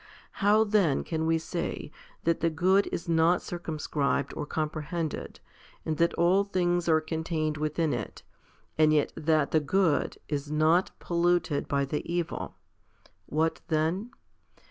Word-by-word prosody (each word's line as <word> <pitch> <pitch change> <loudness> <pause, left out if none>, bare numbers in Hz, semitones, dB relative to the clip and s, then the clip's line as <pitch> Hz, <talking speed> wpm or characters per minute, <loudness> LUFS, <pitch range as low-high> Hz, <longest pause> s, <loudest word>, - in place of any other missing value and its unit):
How 210 +2 +5
then 205 -9 +2
can 160 -1 -2
we 165 0 +3
say 165 -2 -4 0.3
that 165 0 +1
the 165 - +2
good 185 +5 +3
is 170 - -4
not 165 +1 +3
circum 170 -3 -5
scribed 140 -2 -1
or 150 - -5
comprehended, 155 +1 -3 0.5
and 155 -1 -1
that 170 0 +2
all 180 +4 +3
things 175 -3 0
are 160 -1 +5
contained 155 -1 -2
within 155 +1 0
it, - - -5 0.6
and 155 -1 +5
yet 150 -1 +2
that 155 -2 +1
the 160 - +4
good 165 0 +1
is 145 -1 -3
not 160 +4 +3
polluted 170 -3 0
by 140 -1 +1
the 150 +2 -2
evil? 175 -1 -3 0.7
What 160 +2 0
then 165 +8 0
160 Hz, 145 wpm, -28 LUFS, 155-175 Hz, 0.7 s, How